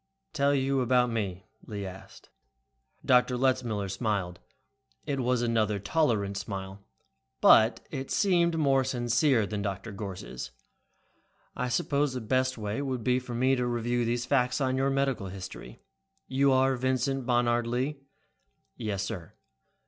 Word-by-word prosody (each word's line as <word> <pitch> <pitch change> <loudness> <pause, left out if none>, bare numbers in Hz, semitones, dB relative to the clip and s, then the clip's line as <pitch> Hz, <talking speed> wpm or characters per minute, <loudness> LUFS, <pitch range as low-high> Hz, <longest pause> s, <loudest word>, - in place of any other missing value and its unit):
"Tell 140 -1 +2
you 135 0 +1
about 125 0 +3
me?" 100 -5 -3 0.2
Lee 100 -2 -5
asked. 95 +1 -11 0.8
Dr. 125 0 +4
Letzmiller 120 -6 0
smiled. 95 -3 -2 0.7
It 140 -2 -2
was 125 -1 +1
another 110 -3 +1
tolerant 100 - 0
smile, 95 -1 -6 0.6
but - - +6
it 135 0 -5
seemed 170 -4 +2
more 135 -3 +3
sincere 120 0 +2
than 105 0 -4
Gorss'. 95 - -5 1.1
"I 125 - -2
suppose 140 +3 0
the 130 - -3
best 130 +3 0
way 105 +4 -3
would 130 -4 -3
be 125 +2 +2
for 125 -2 -7
me 130 +3 +3
to 125 -1 -1
review 120 0 0
these 120 +1 -1
facts 125 0 +1
on 130 -2 +1
your 135 +1 +1
medical 135 -7 0
history. 95 0 -9 0.4
You 135 +1 +3
are 130 0 +3
Vincent 130 +1 -1
Bonard 120 -1 +2
Lee?" 130 +5 -1 0.8
"Yes, 105 -4 -3
sir." 95 -6 -6
120 Hz, 135 wpm, -28 LUFS, 105-130 Hz, 1.1 s, but